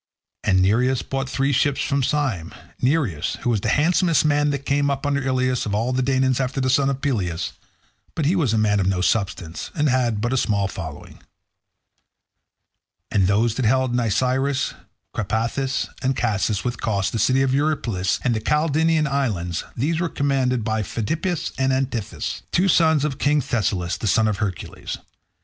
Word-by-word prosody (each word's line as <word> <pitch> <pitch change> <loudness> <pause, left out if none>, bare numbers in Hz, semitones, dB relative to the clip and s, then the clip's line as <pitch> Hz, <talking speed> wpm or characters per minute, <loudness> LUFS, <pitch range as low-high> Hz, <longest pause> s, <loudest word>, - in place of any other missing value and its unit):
And 95 -1 +3
Nireus 125 +6 +2
brought 135 0 -2
three 135 +1 0
ships 140 +1 +1
from 140 -1 0
Syme—Nireus, 125 - -1
who 120 - +1
was 110 -4 0
the 110 - -1
handsomest 165 - +3
man 145 0 +3
that 140 -1 -3
came 140 0 +1
up 140 0 -2
under 140 0 +1
Ilius 130 -2 0
of 100 - -1
all 115 +4 0
the 130 - +1
Danaans 130 0 +1
after 130 +1 -1
the 130 -1 +1
son 135 +1 +3
of 135 0 -3
Peleus—but 115 - -4
he 170 +6 +3
was 150 - +1
a 110 - +1
man 105 -1 +2
of 95 - +1
no 95 -2 +1
substance, 90 -4 -1
and 150 -1 +2
had 120 -4 +1
but 120 +4 -1
a - - +1
small 100 -5 +1
following. 80 -6 -8 1.9
And 95 -3 +3
those 105 +3 +2
that 125 +1 -2
held 130 +2 +2
Nisyrus, 130 +4 +1 0.4
Crapathus, 115 +6 -1
and 130 0 0
Casus, 105 -3 0
with 120 -1 -3
Cos, 100 -3 0
the 115 - -2
city 130 +5 +3
of 130 -1 +1
Eurypylus, 135 -10 0
and 120 -2 +1
the 110 - -2
Calydnian 155 +3 +2
islands, 105 - -1
these 155 +7 0
were 175 -1 0
commanded 130 -5 0
by 110 0 -1
Pheidippus 155 - -2
and 130 0 +2
Antiphus, 130 -5 -2
two 185 +3 +2
sons 160 -4 +4
of 140 -3 -3
King 150 +1 +3
Thessalus 100 -8 -1
the 110 - -2
son 110 +3 +3
of 105 -2 0
Hercules. 95 -4 -4
130 Hz, 170 wpm, -22 LUFS, 105-140 Hz, 1.9 s, sons